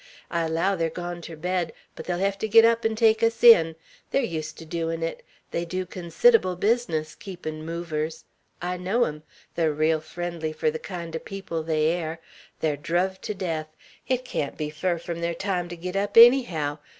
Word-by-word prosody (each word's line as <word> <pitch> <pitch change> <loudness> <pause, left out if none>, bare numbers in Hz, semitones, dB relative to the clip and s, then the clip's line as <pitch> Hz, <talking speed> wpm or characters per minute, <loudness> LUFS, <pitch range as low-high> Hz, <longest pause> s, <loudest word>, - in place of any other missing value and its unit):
I 170 -1 0
allow 165 +5 +1
they're 165 -2 0
gone 175 +1 -6
ter 165 0 -8
bed; 175 0 -2 0.2
but - - -8
they'll 175 -1 -1
hev 195 +2 +1
to 220 - -1
git 225 +1 +7
up 230 0 +3
'n' 225 0 +1
take 220 0 +4
us 230 +1 +1
in. 165 -9 +8 0.3
They're 275 - +1
used 160 -8 -4
ter 165 - -10
doin' 165 0 -3
it. 165 - -3 0.3
They 170 - -1
dew 185 +2 -3
consid'able 185 - +3
business 190 -6 0
keepin' 155 -5 -7
movers. 165 -1 -4 0.4
I 180 +1 -2
know 195 +7 +1
'em. 150 -5 -3 0.3
They're 160 -2 +1
reel 155 +1 +2
friendly 165 0 -5
fur 155 0 0
the 160 - -5
kind 170 -4 -6
o' - - -2
people 190 -4 -5
they 155 -1 0
air. 165 -1 -2 0.4
They're 150 -2 +1
druv 180 +5 -1
to 210 - -4
death. 165 -5 -3 0.4
It 255 -1 0
can't 145 - -3
be 150 -1 -3
far 170 +3 -1
frum 170 0 -6
their 170 0 -1
time 180 -1 -2
to 175 - -7
git 180 +2 -5
up, 200 +2 -1
ennyhow. 210 - +6
170 Hz, 195 wpm, -25 LUFS, 160-195 Hz, 0.4 s, in